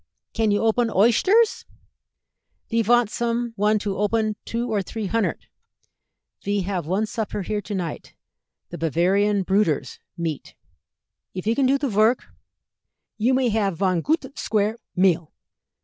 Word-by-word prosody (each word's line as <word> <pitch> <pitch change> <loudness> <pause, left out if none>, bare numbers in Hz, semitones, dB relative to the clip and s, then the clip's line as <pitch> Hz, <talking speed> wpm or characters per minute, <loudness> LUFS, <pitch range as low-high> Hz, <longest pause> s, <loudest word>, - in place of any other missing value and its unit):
Can 225 -1 +1
you 205 +1 +1
open 225 +2 +2
oyshters? 240 - +3 1.1
Ve 230 0 +2
vant 240 +1 +3
some 235 0 -2
one 210 +1 +2
to 200 -2 -3
open 215 +1 +1
two 235 +1 -2
or 205 - +1
tree 215 +3 -5
hundert; 225 +3 -1 1.0
ve 205 0 0
have 180 -4 -3
one 195 +5 +1
supper 215 -2 -4
here 210 +3 -2
to 205 +1 -5
night 170 -5 -5 0.6
the - - -7
'Bavarian 190 +6 +1
Brüders' 165 -10 0 0.2
meet. 165 -4 -4 0.8
If 185 - -5
you 225 - +2
can 265 +2 +2
do 275 +2 +3
the 280 0 -2
vork, 220 +2 +2 0.9
you 250 +4 +3
may 255 -2 +2
have 205 -5 0
von 185 -2 +1
goot 315 - +1
sqvare 220 -5 -1 0.2
meal." 175 -4 +2
210 Hz, 145 wpm, -23 LUFS, 190-230 Hz, 1.1 s, oyshters